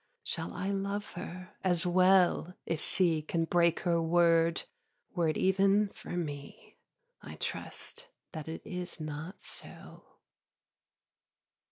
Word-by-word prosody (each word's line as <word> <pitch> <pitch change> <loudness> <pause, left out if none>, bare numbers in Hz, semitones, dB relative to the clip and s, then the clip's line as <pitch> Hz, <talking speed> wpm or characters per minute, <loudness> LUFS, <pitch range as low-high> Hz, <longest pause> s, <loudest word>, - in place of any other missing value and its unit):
Shall - - -3
I 195 +1 -1
love 200 +1 -2
her 185 +1 -7
as 175 -2 +2
well 180 -1 +4
if 165 -2 -2
she 170 -4 +2
Can 165 +2 0
break 170 0 +3
her 170 -2 +2
word 165 0 +4 0.5
were 175 -4 +2
it 155 - 0
even 195 +2 +4
for 175 - -7
me? 145 -4 -6 0.4
I - - -9
trust - - -5 0.2
that 155 -3 -6
it 160 - -6
is 180 -4 -4
not 155 +4 -6
so. - - -7
175 Hz, 125 wpm, -32 LUFS, 165-190 Hz, 0.5 s, well